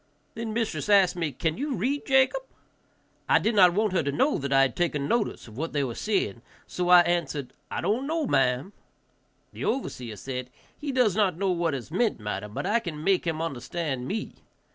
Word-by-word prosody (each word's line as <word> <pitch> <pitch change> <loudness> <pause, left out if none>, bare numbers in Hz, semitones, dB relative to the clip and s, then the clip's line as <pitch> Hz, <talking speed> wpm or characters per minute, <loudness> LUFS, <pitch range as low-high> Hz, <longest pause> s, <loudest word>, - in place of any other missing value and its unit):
Then 225 0 -4
mistress 225 -1 -2
asked 195 -4 +5
me, 165 -4 -2
"Can 160 - -2
you 285 -1 -1
read, 265 +9 -1
Jacob?" 265 - +3 0.9
I - - +6
did 225 - +1
not 180 -4 +6
want 210 -1 +1
her 180 - +3
to 140 -2 -1
know 270 - +1
that 140 0 -4
I 135 0 +5
had 130 -3 0
taken 150 -5 0
notice 235 - -1
of 110 +3 -10
what 165 +1 -3
they 145 -1 +1
were 125 -3 -3
saying, 155 - -1 0.2
so 180 0 -3
I 180 -1 +9
answered, 160 -6 -1 0.2
"I - - -3
don't 240 +7 0
know, 320 0 0
ma'am." 135 - +1 0.8
The - - -7
overseer 125 - -3
said, 125 +4 -5 0.3
"He 295 -2 -4
does 250 -7 +2
not 200 -5 +2
know 195 0 +1
what 170 -4 0
is 130 +3 -7
meant, 215 - +1
madam, 105 -1 -4
but - - -3
I 215 +5 +2
can 155 -7 -6
make 190 -1 +2
him 160 0 -1
understand 140 -2 -3
me." 215 +2 -3
175 Hz, 205 wpm, -27 LUFS, 140-220 Hz, 0.9 s, I